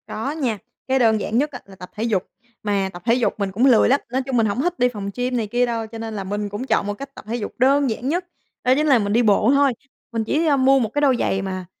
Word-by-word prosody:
Có 225 Hz, +6 st, -3 dB
nha, 265 Hz, -8 st, -2 dB, 0.3 s
cái 265 Hz, 0 st, +2 dB
đơn 220 Hz, -3 st, +3 dB
giản 220 Hz, -, -1 dB
nhất 290 Hz, +3 st, +1 dB
á 250 Hz, -, -7 dB
là 195 Hz, -, -14 dB
tập 180 Hz, -1 st, -11 dB
thể 215 Hz, -, -3 dB
dục, 210 Hz, -6 st, 0 dB, 0.4 s
mà 200 Hz, -2 st, 0 dB
tập 175 Hz, -, -9 dB
thể 235 Hz, -, +4 dB
dục 245 Hz, -1 st, +1 dB
mình 200 Hz, -1 st, -1 dB
cũng 225 Hz, +7 st, +1 dB
lười 250 Hz, -5 st, +5 dB
lắm, 275 Hz, +2 st, +4 dB
nói 260 Hz, +1 st, 0 dB
chung, 260 Hz, -1 st, -2 dB
mình 225 Hz, -, +3 dB
hổng 210 Hz, +4 st, -1 dB
thích 350 Hz, +3 st, -2 dB
đi 250 Hz, -, +4 dB
phòng 205 Hz, -4 st, -5 dB
gym 250 Hz, 0 st, -1 dB
này 225 Hz, -3 st, -1 dB
kia 240 Hz, +3 st, +1 dB
đâu, 230 Hz, -2 st, -3 dB
cho 225 Hz, +1 st, -9 dB
nên 225 Hz, -1 st, -5 dB
là 200 Hz, -, -4 dB
mình 205 Hz, +2 st, -3 dB
cũng 205 Hz, +6 st, -5 dB
chọn 200 Hz, -, +1 dB
một 205 Hz, -, -1 dB
cách 275 Hz, +6 st, -10 dB
tập -, -, -11 dB
thể 230 Hz, -, -2 dB
dục 225 Hz, -4 st, -5 dB
đơn 275 Hz, +2 st, +3 dB
giản 235 Hz, +4 st, -3 dB
nhất, 350 Hz, +4 st, -1 dB, 0.4 s
đó 250 Hz, -, +4 dB
chính 305 Hz, +2 st, +1 dB
là 265 Hz, -5 st, +5 dB
mình 205 Hz, -1 st, -1 dB
đi 235 Hz, -, +4 dB
bộ 215 Hz, +2 st, +4 dB
thôi. 280 Hz, -2 st, +3 dB, 0.4 s
Mình 230 Hz, -2 st, -1 dB
chỉ, 300 Hz, +9 st, 0 dB
ơ, 290 Hz, -3 st, +3 dB
mua 270 Hz, +1 st, +4 dB
một 225 Hz, -4 st, 0 dB
cái 290 Hz, -, 0 dB
đôi 275 Hz, -3 st, +4 dB
giày 195 Hz, -, 0 dB
mà, 185 Hz, -1 st, -4 dB
235 Hz, 305 wpm, -21 LUFS, 210-265 Hz, 0.4 s, lười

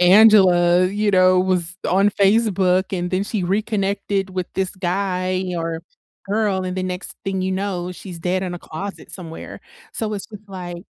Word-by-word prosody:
Angela, 180 Hz, -2 st, +6 dB
you 205 Hz, +2 st, 0 dB
know, 185 Hz, -1 st, +5 dB
was 180 Hz, -2 st, 0 dB
on 195 Hz, +3 st, +4 dB
Facebook, 195 Hz, -3 st, +3 dB
and 175 Hz, 0 st, -3 dB
then 185 Hz, +1 st, +1 dB
she 210 Hz, -3 st, -2 dB
reconnected 200 Hz, -1 st, -1 dB
with 185 Hz, -1 st, -3 dB
this 190 Hz, -1 st, 0 dB
guy 185 Hz, 0 st, -1 dB
or 165 Hz, -1 st, -3 dB, 0.4 s
girl, 200 Hz, -2 st, 0 dB
and 185 Hz, 0 st, -3 dB
the 185 Hz, -, -1 dB
next 185 Hz, 0 st, -4 dB
thing 190 Hz, -1 st, -1 dB
you 190 Hz, 0 st, -1 dB
know, 185 Hz, -2 st, -2 dB
she's 180 Hz, -2 st, -9 dB
dead 185 Hz, +2 st, -1 dB
in 180 Hz, -1 st, -3 dB
a -, -, -6 dB
closet 195 Hz, +6 st, -7 dB
somewhere. 165 Hz, -3 st, -8 dB, 0.3 s
So 215 Hz, -1 st, -2 dB
it's 200 Hz, -, -4 dB
just 210 Hz, -1 st, -13 dB
like 180 Hz, -2 st, -6 dB
185 Hz, 170 wpm, -21 LUFS, 180-200 Hz, 0.4 s, Angela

